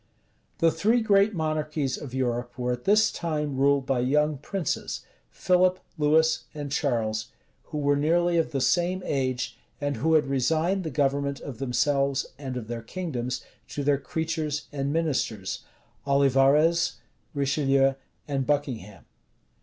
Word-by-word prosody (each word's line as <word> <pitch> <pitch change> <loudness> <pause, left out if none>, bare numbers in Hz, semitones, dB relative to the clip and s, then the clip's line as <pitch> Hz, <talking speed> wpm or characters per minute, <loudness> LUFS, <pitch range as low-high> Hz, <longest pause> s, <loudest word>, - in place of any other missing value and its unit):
The 165 -2 +4
three 225 +8 +2
great 205 -2 +3
monarchies 155 -4 -1
of 140 - -8
Europe 120 -1 -2
were 125 0 -1
at 125 0 -4
this 215 +2 +4
time 150 -4 -2
ruled 140 0 +3
by 135 -2 +1
young 150 +3 +1
princes, 185 +1 -3 0.3
Philip, 185 0 +2 0.2
Louis, 160 +1 +3 0.2
and 145 -2 -5
Charles, 110 -6 0 0.4
who - - -6
were 145 -1 +2
nearly 170 +4 +2
of 165 - +1
the 135 -3 -2
same 180 +5 +1
age, 130 -3 -2 0.2
and 145 -1 -2
who 160 +2 +2
had 150 -2 +4
resigned 160 +8 +1
the 160 - -3
government 140 0 0
of 130 -5 -8
themselves, 135 +1 +1
and 130 -3 -5
of 115 -3 -6
their 120 0 -4
kingdoms, 125 -3 -4 0.2
to 145 - -4
their 140 -1 +2
creatures 155 +1 -2
and 140 -1 -2
ministers, 130 - -1 0.4
Olivarez, 140 +4 +4 0.4
Richelieu, 135 -1 +2 0.3
and 135 -3 -1
Buckingham. 125 -9 -2
145 Hz, 140 wpm, -26 LUFS, 135-160 Hz, 0.4 s, The